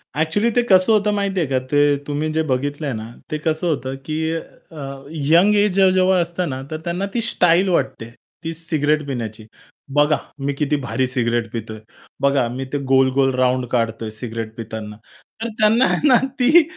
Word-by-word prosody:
Actually 160 +9 +1
ते 245 - +5
कसं 185 +2 +5
होतं 210 -1 +2
माहिती 200 -2 -1
आहे 160 - 0
का, 130 -1 +1
ते 145 0 +4
तुम्ही 150 +2 -1
जे 160 - +1
बघितलंय 145 +1 -2
ना, 110 +1 -6 0.2
ते 155 - -1
कसं 160 +3 -1
होतं 135 -4 -2
की 160 +1 -2
अ, 140 -4 -8
यंग 165 +7 +3
एज 205 -1 +3
जे 190 -1 +5
जेव्हा 185 0 +3
असतं 170 0 -2
ना 130 0 -4
तर 155 - -2
त्यांना 175 +3 -1
ती 235 - 0
स्टाईल 185 -4 +3
वाटते. 115 -9 -1 0.3
ती 165 0 -3
सिगारेट 155 -2 0
पिण्याची. 110 -5 -5 0.5
बघा, 150 +1 +3 0.2
मी 140 +1 -1
किती 150 +1 0
भारी 130 +1 -1
सिगारेट 120 -2 -1
पितोय, 110 -1 -6 0.4
बघा 140 -3 +2
मी 130 +2 -5
ते - - +1
गोल-गोल 135 0 +3
राउंड 130 0 +1
काढतोय 115 -2 -1
सिगारेट 115 -1 -5
पिताना 110 -2 -7 0.4
तर 230 - -1
त्यांना 225 +4 +4 0.2
ना 270 -4 +6 0.2
ती, 295 +7 +6
145 Hz, 175 wpm, -20 LUFS, 130-180 Hz, 0.5 s, ना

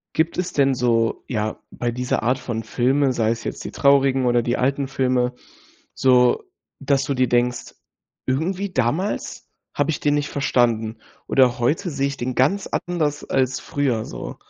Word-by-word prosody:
Gibt 165 +2 +1
es 180 -1 -2
denn 135 -2 +3
so, 115 -2 +1
ja, 110 -3 -2
bei 120 - -2
dieser 125 +1 -1
Art 125 +3 +1
von 120 -3 -4
Filme, 130 +4 +1
sei 115 -2 +1
es 115 0 -4
jetzt - - -5
die - - -6
traurigen 135 -2 +3
oder 120 -1 +3
die 120 +1 -1
alten 135 +1 0
Filme, 125 -2 +1 0.6
so, 125 - +3 0.4
dass 135 -1 +1
du 140 - -1
dir 130 -2 +1
denkst: 120 0 0 0.5
„Irgendwie 180 +9 -1
damals 145 - -1 0.3
habe - - 0
ich - - -4
den 145 0 +2
nicht 145 0 -1
verstanden. 115 -5 +1 0.3
Oder 125 -2 +3
heute 155 - 0
sehe 140 -3 -1
ich 140 -1 -5
den 125 +1 -3
ganz 190 +10 +2
anders 155 -5 -2
als 130 0 0
früher, 130 -6 -1
so“? - - -7
130 Hz, 170 wpm, -22 LUFS, 120-140 Hz, 0.6 s, denn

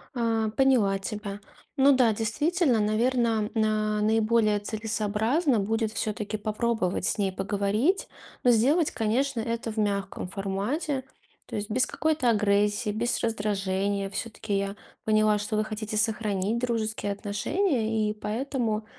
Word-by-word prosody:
А, 225 -2 +1
поняла 220 -6 +3
тебя. 205 0 -5 0.4
Ну 275 +1 +6
да, 245 -4 +4
действительно, 265 - +1
наверно, 225 0 +1
на 215 -1 +1
наиболее 215 0 +3
целесообразно 220 - 0
будет 220 +2 -1
всё-таки 215 -1 -3
попробовать 215 -3 -1
с - - 0
ней 195 -2 +1
поговорить. 205 - 0 0.4
Но 245 - +6
сделать, 280 +8 +3
конечно, 240 +4 0
это 230 0 -2
в 215 - -10
мягком 200 -3 -1
формате. 205 - -2 0.4
То - - -7
есть 205 0 -3
без 255 +4 +2
какой-то 310 -5 0
агрессии, 210 0 +2
без 230 +3 0
раздражения. 200 -2 -1
Всё-таки 215 0 -3
я 200 0 -2 0.3
поняла, 215 -1 +3
что 210 +1 -3
вы 215 - +2
хотите 215 0 -5
сохранить 215 -1 0
дружеские 220 -4 -1
отношения, 220 - 0
и - - -1
поэтому, 220 0 -2
215 Hz, 130 wpm, -27 LUFS, 205-235 Hz, 0.4 s, Ну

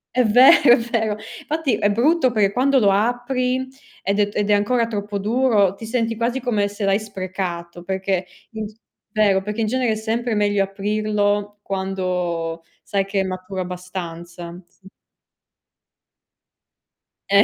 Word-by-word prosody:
È 250 - +4
vero, 250 +5 +7
è - - +5
vero. 225 -3 -1 0.3
Fatti 305 -6 0
è 205 0 +1
brutto 260 +5 +3
per 210 -4 +2
quando 265 +4 +3
lo 205 -4 +4
apri, 250 +4 0 0.3
ed 200 +2 0
è 205 0 +3
t - - -15
ed 210 0 0
è - - +5
ancora 230 +3 +2
troppo 205 -2 -3
duro, 215 -3 +2
ti 225 - -9
senti 230 0 -1
quasi 235 +3 -1
come 225 -5 0
se 205 0 -4
l'hai 195 +1 +3
sprecato, 185 -4 -5
perché 190 0 -1 0.3
inc 220 -2 -5 0.4
vero, 205 -2 +3
perché 210 +3 -4
in 220 - +1
genere 250 0 +1
è - - 0
sempre 225 +2 -2
meglio 205 -1 +2
aprirlo 205 +1 -1
quando 180 -4 -2 0.2
sai 195 -1 -1
che 195 0 -1
è - - +2
maturo 185 0 -5
abbastanza. 175 -1 -7
Sì. 190 +2 -21 2.4
Eh, 200 +1 +6
205 Hz, 150 wpm, -21 LUFS, 190-230 Hz, 2.4 s, vero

